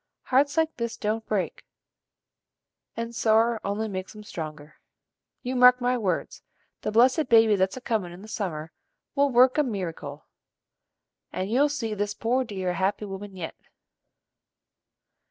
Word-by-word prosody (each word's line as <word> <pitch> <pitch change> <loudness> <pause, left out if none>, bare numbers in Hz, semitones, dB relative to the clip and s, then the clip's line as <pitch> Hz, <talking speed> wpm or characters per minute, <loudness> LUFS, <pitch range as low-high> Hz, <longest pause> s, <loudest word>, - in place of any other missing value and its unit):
Hearts 285 +3 +2
like 320 0 +1
this 235 -1 -3
don't 220 +1 -1
break, 205 -4 -2 1.3
and 230 0 -4
sorrer 225 0 +3
only 205 +2 -2
makes 190 +1 -6
'em 210 - -10
stronger. 155 -5 -8 0.6
You 255 +1 -3
mark 250 0 +7
my 250 0 +1
words: 195 -8 -2 0.4
the - - -2
blessed 250 +6 +4
baby 225 -2 +6
that's 190 +3 0
a - - -7
comin' 215 -8 -1
in 180 +3 -11
the - - -10
summer 165 -8 -4 0.4
will 280 0 +3
work 255 +3 +5
a - - +5
merrycle, 165 - -5 1.1
and 190 +3 -3
you'll 280 +5 +4
see 245 -7 -3
this 205 0 -2
poor 250 +3 +1
dear 190 -6 -3
a - - -2
happy 190 +4 -1
woman 195 0 -7
yet." 175 -3 -5
220 Hz, 150 wpm, -26 LUFS, 190-250 Hz, 1.3 s, mark